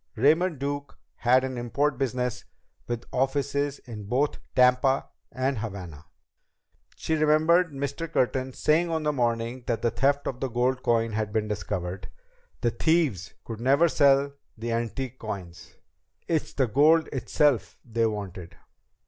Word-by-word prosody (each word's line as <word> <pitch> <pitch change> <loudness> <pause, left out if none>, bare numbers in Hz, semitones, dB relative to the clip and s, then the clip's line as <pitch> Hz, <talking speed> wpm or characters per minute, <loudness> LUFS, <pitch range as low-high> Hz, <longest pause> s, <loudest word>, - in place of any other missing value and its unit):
Raymond 160 +7 +3
Duke 140 +1 -4 0.2
had 125 +2 +4
an 130 -2 -3
import 135 +3 0
business 125 -2 -1 0.4
with 120 -1 -4
offices 140 +2 0
in 110 -4 -9
both 130 +7 0 0.2
Tampa 125 +1 +3 0.2
and 130 -1 -1
Havana! 90 -8 -7 0.9
She 160 - -2
remembered 160 +3 +3
Mr. 140 +4 -4
Curtin 130 -2 0
saying 165 +6 +2
on 160 -1 -1
the 150 0 +1
morning 120 -1 -1
that 115 -2 -1
the 115 - +2
theft 140 +5 +1
of 125 - -4
the 135 - -2
gold 125 +2 0
coins 115 -2 +1
had 105 -1 -2
been 110 0 0
discovered: 95 -3 -4 0.5
"The 120 -2 +2
thieves 145 - 0
could 115 -1 -7
never 140 +7 +4
sell 140 -2 +3 0.2
the 115 +1 -4
antique 120 +2 -3
coins. 95 -6 -7 0.5
It's 160 -2 -1
the 135 - +2
gold 150 +8 +4
itself 140 0 +1
they 115 -1 +1
wanted!" 95 -5 -6
130 Hz, 140 wpm, -26 LUFS, 115-145 Hz, 0.9 s, had